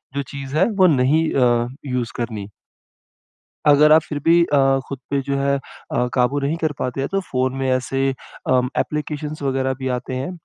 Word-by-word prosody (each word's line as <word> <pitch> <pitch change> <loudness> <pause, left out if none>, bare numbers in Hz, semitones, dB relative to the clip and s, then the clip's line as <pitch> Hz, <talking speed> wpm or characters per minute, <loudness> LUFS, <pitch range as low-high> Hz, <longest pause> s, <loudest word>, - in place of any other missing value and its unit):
जो 140 - 0
चीज़ 140 0 -6
है, 180 - +5
वो 195 -4 +4
नहीं 150 +2 +3
अ, 120 -2 +3 0.2
यूज़ 125 -3 -2
करनी। 110 -4 -4 1.2
अगर 150 +1 +6
आप 160 +1 +6
फिर 150 - -3
भी 170 +1 +5
अ, 135 -3 +3
खुद 140 - -5
पे 140 - +1
जो 140 0 -2
है 140 0 +1
अ, 125 -2 -4
काबू 130 +3 +2
नहीं 140 +4 -1
कर 160 -3 -1
पाते 125 +1 -2
हैं, 135 - -1
तो 195 - +1
फ़ोन 130 -7 -1
में 135 0 -1
ऐसे, 135 +1 0 0.4
अ, 130 -1 +4 0.2
एप्लीकेशंस 150 0 -3
वगैरह 130 -1 0
भी 130 -1 -3
आते 130 - -7
हैं। 130 +5 -3
135 Hz, 190 wpm, -21 LUFS, 130-150 Hz, 1.2 s, अगर